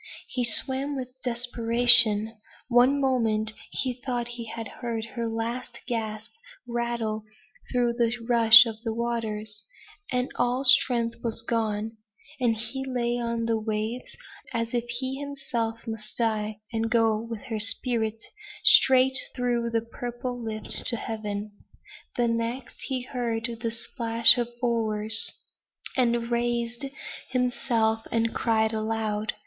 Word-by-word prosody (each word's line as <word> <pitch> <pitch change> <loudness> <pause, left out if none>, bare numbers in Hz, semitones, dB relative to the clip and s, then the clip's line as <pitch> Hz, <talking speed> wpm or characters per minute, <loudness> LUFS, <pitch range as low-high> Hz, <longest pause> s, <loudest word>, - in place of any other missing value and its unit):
He 250 - -2
swam 265 +4 +2
with 255 -2 -5
desperation. 235 -2 +5 0.3
One 250 +3 +4
moment 225 -5 0 0.2
he 255 -2 -2
thought 245 -1 -4
he 240 -1 -7
had 225 0 -6
heard 230 -1 -5
her 235 -2 -3
last 235 +2 -5
gasp 220 -3 -4 0.4
rattle 235 -2 -3 0.5
through 245 -1 +1
the 235 -1 +1 0.2
rush 230 -1 +8
of 225 -2 -5
the 225 -2 -3
waters; 220 -3 -4 0.5
and 250 0 -1
all 250 +2 0
strength 245 -3 +4
was 230 -1 0
gone, 220 -1 -2 0.4
and 240 -3 +1
he 230 +5 -3
lay 245 -2 -2
on 235 -1 -2
the 225 -1 0
waves 220 +3 -4 0.3
as 230 0 -3
if 240 -1 -1
he 260 +2 -3
himself 265 -5 -4
must 220 -1 -7
die, 215 -2 -1
and 225 0 -1
go 225 -1 +2
with 230 -2 -7
her 220 -2 -4
spirit 225 0 -1 0.4
straight 265 0 +6 0.2
through 240 -2 -1
that 230 0 -3
purple 245 0 -6
lift 215 -1 -2
to 235 - +3
heaven; 210 -2 -5 0.7
the 240 -1 +2
next 230 +2 -3
he 260 -2 -2
heard 235 -3 -3 0.2
the 230 - -1
splash 230 0 +4
of 240 - -1 0.2
oars, 220 -2 +1 0.6
and 235 -2 0
raised 235 +1 -1 0.4
himself 245 -3 0
and 230 0 0
cried 220 -1 +1
aloud. 215 -1 -2
230 Hz, 130 wpm, -26 LUFS, 225-245 Hz, 0.7 s, rush